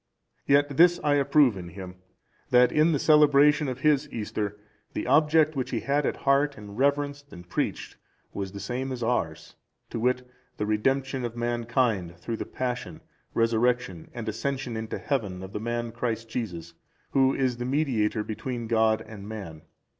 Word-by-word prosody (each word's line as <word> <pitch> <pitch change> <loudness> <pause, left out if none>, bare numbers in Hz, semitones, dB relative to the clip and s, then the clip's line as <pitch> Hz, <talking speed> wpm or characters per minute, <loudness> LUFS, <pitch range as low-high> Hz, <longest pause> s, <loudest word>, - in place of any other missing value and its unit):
(375) - - -20
Yet 145 -1 -1 0.2
this - - -10
I 145 - +4
approve 140 -4 +4
in 90 -2 -7
him, 90 +1 -8 0.6
that 125 0 +5
in 155 +2 +4
the 150 - +2
celebration 150 0 +5
of 130 0 -4
his 150 -1 +3
Easter, 105 -2 -3 0.4
the - - -3
object 155 0 +4
which 130 -1 -2
he - - -2
had 140 +1 +1
at - - -1
heart 140 +1 +2
and 105 -1 -10
reverenced 145 +2 0
and 90 0 -11
preached 90 - -3 0.4
was 95 -1 -4
the 100 - -8
same 125 +6 -3
as 125 -2 -4
ours, 95 -10 -2 0.4
to - - -3
wit, 125 +2 0 0.3
the 105 - -1
redemption 135 +5 0
of 120 -1 -4
mankind, 120 -6 0
through 115 +6 -4
the - - -4
Passion, 125 -1 -4 0.3
Resurrection 115 -5 +1
and 120 -2 -7
Ascension 125 +2 -3
into 110 0 -4
Heaven 100 -10 -2
of 95 - -9
the - - -3
Man 120 +1 -3
Christ 115 -1 -3
Jesus, 90 -8 -5 0.4
who 135 0 +3
is 130 -3 0
the 120 - -4
mediator 125 -6 0
between 120 +2 -4
God 110 -1 +2
and 105 -2 -10
man. 95 -8 -7
120 Hz, 170 wpm, -27 LUFS, 110-140 Hz, 0.6 s, that